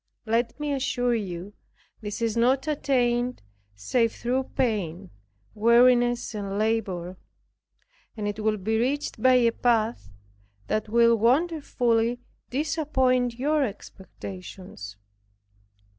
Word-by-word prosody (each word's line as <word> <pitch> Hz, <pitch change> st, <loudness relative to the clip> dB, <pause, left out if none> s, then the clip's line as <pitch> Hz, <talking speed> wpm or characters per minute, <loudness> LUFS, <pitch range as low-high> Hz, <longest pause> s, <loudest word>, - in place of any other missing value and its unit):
Let 230 Hz, +3 st, 0 dB
me 295 Hz, -1 st, -1 dB
assure 255 Hz, -3 st, 0 dB
you, 195 Hz, -3 st, -4 dB, 0.5 s
this 210 Hz, +3 st, -5 dB
is 225 Hz, -1 st, 0 dB
not 255 Hz, +5 st, +2 dB
attained, 250 Hz, -, 0 dB, 0.3 s
save 230 Hz, -, 0 dB
through 255 Hz, +2 st, -1 dB
pain, 195 Hz, -7 st, -1 dB, 0.4 s
weariness 240 Hz, +2 st, +4 dB
and 200 Hz, -2 st, -4 dB
labor; 195 Hz, -5 st, -1 dB, 1.0 s
and 210 Hz, -1 st, -3 dB
it 205 Hz, +1 st, -4 dB
will 215 Hz, 0 st, 0 dB
be 220 Hz, +3 st, -1 dB
reached 265 Hz, -1 st, -2 dB
by 255 Hz, +1 st, +5 dB
a 235 Hz, -2 st, +4 dB
path 225 Hz, -, 0 dB, 0.6 s
that 215 Hz, 0 st, -2 dB
will 235 Hz, +1 st, +5 dB
wonderfully 245 Hz, -3 st, +1 dB, 0.3 s
disappoint 260 Hz, -4 st, 0 dB
your 295 Hz, +3 st, +1 dB
expectations. 185 Hz, -, -8 dB
235 Hz, 105 wpm, -26 LUFS, 210-255 Hz, 1.0 s, by